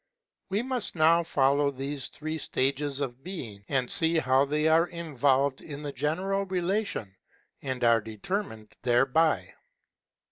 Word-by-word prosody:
We 200 +4 0
must 255 -6 -2
now 165 +1 +5
follow 140 -2 +2
these 140 0 -3
three 155 +1 -5
states 140 +1 -1
of 130 -1 -4
being, 125 - -7
to 130 -3 +1
see 165 +4 +3
how 135 -2 +3
they 150 +2 0
are 165 +2 +4
involved 140 -5 0
in 150 -1 -8
the 145 - -4
general 190 +8 -1
relation, 185 - -2 0.5
and 130 -2 -4
are 115 -1 +5
determined 110 - -5
thereby. 135 +6 +2
145 Hz, 135 wpm, -28 LUFS, 130-170 Hz, 0.5 s, now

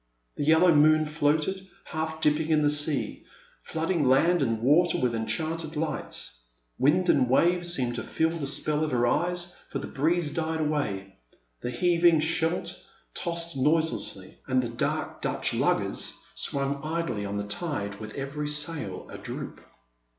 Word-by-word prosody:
The 145 - -2
yellow 160 +3 +6
moon 155 +1 +5
floated, 155 +5 0 0.2
half 160 0 -4
dipping 150 +1 +2
in 155 -1 +3
the 145 - +3
sea, 145 -1 0 0.4
flooding 160 -2 -1
land 170 +6 +4
and 115 -4 0
water 150 +9 +4
with 125 -2 +1
enchanted 160 +7 -3
lights. 150 - -4 0.4
Wind 175 +7 +3
and 130 -7 +3
wave 175 +6 +3
seemed 130 -8 +1
to - - -3
feel 160 0 0
the 140 - -2
spell 150 +2 +1
of 155 - 0
her 120 -2 +1
eyes, 175 +6 0
for - - -3
the - - -5
breeze 155 +2 0
died 160 0 -1
away, 125 -11 -2 0.4
the - - -3
heaving 170 +4 +3
Scheldt 165 +2 0 0.4
tossed 170 -2 -3
noiselessly, 160 +4 0
and 130 0 +2
the 120 - -3
dark 115 - -3
Dutch - - -1
luggers - - 0 0.2
swung 140 0 -1
idly 155 -9 -2
on 100 0 -3
the 100 - -2
tide 100 - -3
with 110 -1 -8
every 140 +2 -4
sail 150 - -2
adroop. - - -7
150 Hz, 150 wpm, -27 LUFS, 135-165 Hz, 0.4 s, yellow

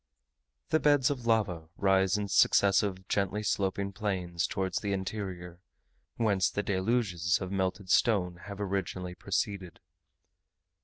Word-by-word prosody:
The 155 - +3
beds 145 -3 +3
of 125 -4 -5
lava 90 -8 0
rise 95 0 +3
in 105 -1 -2
successive 95 0 +3
gently 100 +1 -1
sloping 100 -1 -1
plains, 90 -5 -2
towards 95 -1 -2
the 100 -1 -2
interior, 95 -3 -5 0.6
whence 100 -5 +2
the 105 - -2
deluges 95 -3 +1
of 95 -1 -5
melted 95 0 -2
stone 90 -6 +2
have 100 0 -7
originally 95 -2 -3
proceeded. 95 -1 -3
95 Hz, 120 wpm, -30 LUFS, 90-105 Hz, 0.6 s, The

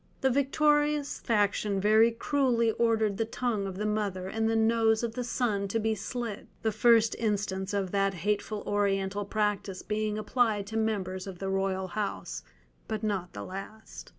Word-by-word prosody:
The 265 - +3
victorious 295 +2 +2
faction 205 -2 +1
very 215 +3 +5
cruelly 235 -1 +1
ordered 220 -3 +1
the 225 - 0
tongue 225 -3 -2
of 190 -1 -6
the 210 - -2
mother 205 -3 -1
and 220 +3 0
the 225 - +1
nose 225 0 +3
of 230 -1 -2
the 250 - -3
son 220 -5 -1
to 225 +3 -1
be 220 0 +1
slit—the 220 +1 -4
first 225 +1 +4
instance 200 -3 -1
of 195 -3 -1
that 195 -1 +1
hateful 205 +3 -2
Oriental 200 0 0
practice 205 -2 -1
being 215 0 -1
applied 215 -1 +1
to 220 +2 -7
members 195 -4 -1
of 190 -2 -7
the 195 +2 -3
royal 190 -1 -1
house, 95 - -3 0.5
but 220 -1 -3
not 195 -4 -2
the - - -6
last. 195 +4 -9
210 Hz, 165 wpm, -29 LUFS, 195-225 Hz, 0.5 s, very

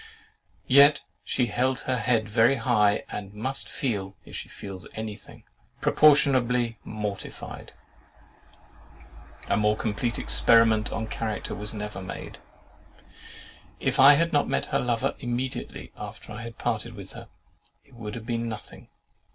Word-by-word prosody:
Yet 140 +5 +6 0.2
she 125 - 0
held 130 +2 0
her 130 -1 -1
head 115 -1 +1
very 115 +5 +4
high, 110 -5 +2
and 100 0 -6
must 130 +6 -2
feel 100 -6 -3
(if - - -11
she - - -6
feels 95 -2 -9
any 110 -1 -4
thing) - - -16 0.4
proportionably 125 -6 +4
mortified.—A 105 -2 -6 1.9
more 105 0 +2
complete 115 +2 -2
experiment 110 -2 +4
on 110 - -2
character 110 -1 -4
was 105 +1 -2
never 105 -2 -5
made. 95 - -8 1.4
If - - -1
I 140 +2 +9
had 165 +3 +1
not 145 - +3
met - - 0
her - - +3
lover 120 -2 0
immediately 125 +1 -4
after - - -9
I 115 +2 -6
parted 115 - -3
with - - -10
her, - - -11 0.6
it 140 - -24
would 110 -3 -7
have 115 -2 -7
been 115 -1 -2
nothing. 110 -2 -9
115 Hz, 135 wpm, -26 LUFS, 105-125 Hz, 1.9 s, I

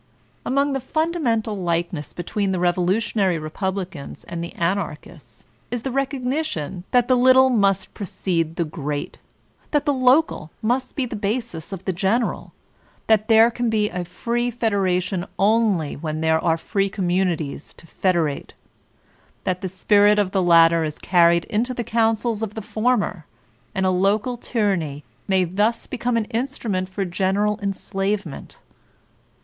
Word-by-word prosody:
Among 280 +2 +1
the 270 - 0
fundamental 260 -7 -1
likenesses 170 -4 -2
between 195 +3 -2
the 185 - 0
Revolu 180 +2 +2
tionary 195 -6 0
Republicans 180 0 -5
and 170 0 -5
the 170 - -6
Anarchists 165 - -4 0.3
is 245 -1 -4
the 265 - -2
recognition 260 - -2
that 245 -1 +3
the 255 - +4
little 260 +1 +6
must 195 -4 +1
precede 170 -4 -2
the 170 - 0
great; 150 -2 -5 0.5
that 295 -1 +1
the 290 - +2
local 255 - +2
must 250 +3 0
be 270 - 0
the 230 - -6
basis 205 -5 -3
of 190 -2 -7
the 190 - 0
general; 200 +7 -1 0.5
that 220 -1 +3
there 225 +1 +6
can 240 0 -1
be 210 -1 +1
a 180 0 -3
free 235 +7 -2
fed 230 -2 -1
eration 185 -1 0
only 200 -6 +2
when 155 +1 -4
there 160 0 +2
are 165 -1 +2
free 195 +3 -1
communities 175 -6 -1
to - - -16
federate; 165 -4 -1 0.9
that 185 0 -1
the 190 - -3
spirit 205 +2 +4
of 200 -3 +1
the 195 - +1
latter 165 -1 +5
is 155 -1 -4
carried 170 -1 +3
into 245 +4 -1
the 240 - -2
councils 225 0 +1
of 215 -2 -4
the 220 - -5
former, 215 -8 -1 0.5
and 190 0 +1
a 185 - +3
local 200 +6 +1
tyranny 190 - -1 0.2
may 190 -2 +3
thus 205 +6 0
become 240 -1 -1
an 225 - 0
in 235 +4 0
strument 200 -9 -3
for 195 +1 -3
general 195 +4 0
enslavement. 195 -3 -3
195 Hz, 155 wpm, -22 LUFS, 175-230 Hz, 0.9 s, little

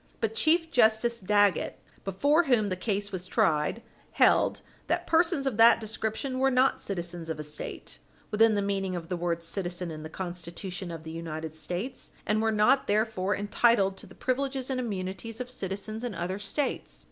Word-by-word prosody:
But 225 -1 -1
Chief 325 +6 +2
Justice 235 -1 +3
Dagget, 205 -2 +2 0.3
before 285 - +2
whom 235 -7 +3
the 185 - -1
case 200 +1 -2
was 185 -1 -3
tried, 155 +7 +1 0.3
held - - +4 0.3
that - - 0
persons 330 -3 +2
of 260 -6 -1
that 230 +1 +7
description 220 +4 -3
were 270 +1 +4
not 255 +1 +3
citizens 175 -3 -4
of 160 - -2
a - - -3
State, 150 - -7 0.3
within 220 +1 +5
the 200 - +1
meaning 195 -2 -1
of 170 -1 -6
the 180 - -1
word 170 -1 -2
citizen 175 0 -2
in 155 -1 -7
the 155 - -7
Constitution 175 +1 -6
of 165 -2 -7
the 160 - -7
United 160 -1 -5
States, 175 - -4 0.2
and 215 +1 +1
were 225 0 +2
not 215 +6 +3
therefore 205 -2 +1
entitled 205 -1 +3
to - - -7
the 190 - -15
privileges 265 0 -1
and 255 - -1
immunities 205 0 -4
of 250 0 -5
citizens 215 0 -5
in 240 -5 -3
other 180 +4 -3
States. 235 +8 -2
205 Hz, 180 wpm, -28 LUFS, 175-235 Hz, 0.3 s, that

